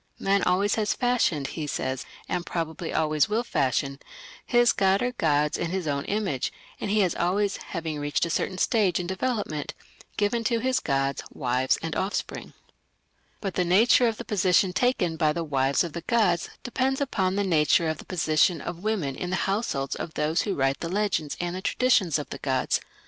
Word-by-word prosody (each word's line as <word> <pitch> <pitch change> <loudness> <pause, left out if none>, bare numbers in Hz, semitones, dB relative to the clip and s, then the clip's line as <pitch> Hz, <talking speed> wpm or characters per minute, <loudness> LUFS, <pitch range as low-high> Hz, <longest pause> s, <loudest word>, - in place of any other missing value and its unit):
"Man 195 0 +2
always 195 +3 +2
has 210 - 0
fashioned", 240 - +1
he 155 -3 -5
says, 130 -2 -3 0.2
"and 180 -1 -2
probably 165 -1 -4
always 155 0 +2
will 220 +3 +1
fashion, 140 - 0 0.5
his 240 -1 +4
god 195 +2 +2
or 250 - 0
gods 150 -9 +1
in 170 - -1
his 185 -2 -2
own 140 -1 -1
image, 195 -11 -1 0.3
and 205 - -3
he 210 +1 +3
has 185 -3 +2
always, 195 +3 0
having 160 -4 -5
reached 145 +3 0
a 170 - -3
certain 185 - -1
stage 200 -4 +2
in 180 - -3
development, 190 - -2 0.4
given 215 +3 +1
to 235 +1 +2
his 255 +2 +1
gods 135 -1 -1
wives 130 -1 0
and 165 -2 -3
offspring; 195 +2 -3 0.9
but 195 -3 -3
the 180 - +1
nature 220 +7 +5
of 225 -2 -1
the 235 - -7
position 185 -2 +2
taken 185 -8 +1
by 155 -1 +3
the 165 +2 -2
wives 140 -1 +1
of 170 -3 -5
the 170 - -5
gods 200 -8 +1
depends 265 +2 0
upon 195 -9 0
the 205 - +1
nature 165 -2 +3
of 160 -1 -2
the - - -10
position 160 -1 +2
of 175 +3 -6
women 190 -11 -1
in 180 - -4
the 185 - 0
households 195 - -1
of 160 - -6
those 155 +3 +1
who 200 -3 -2
write 135 0 +1
the 165 - -4
legends 190 -6 -1
and 175 0 -2
the 185 - -4
traditions 205 - +2
of 150 - -5
the - - -5
gods. 130 -2 0
180 Hz, 190 wpm, -26 LUFS, 150-205 Hz, 0.9 s, nature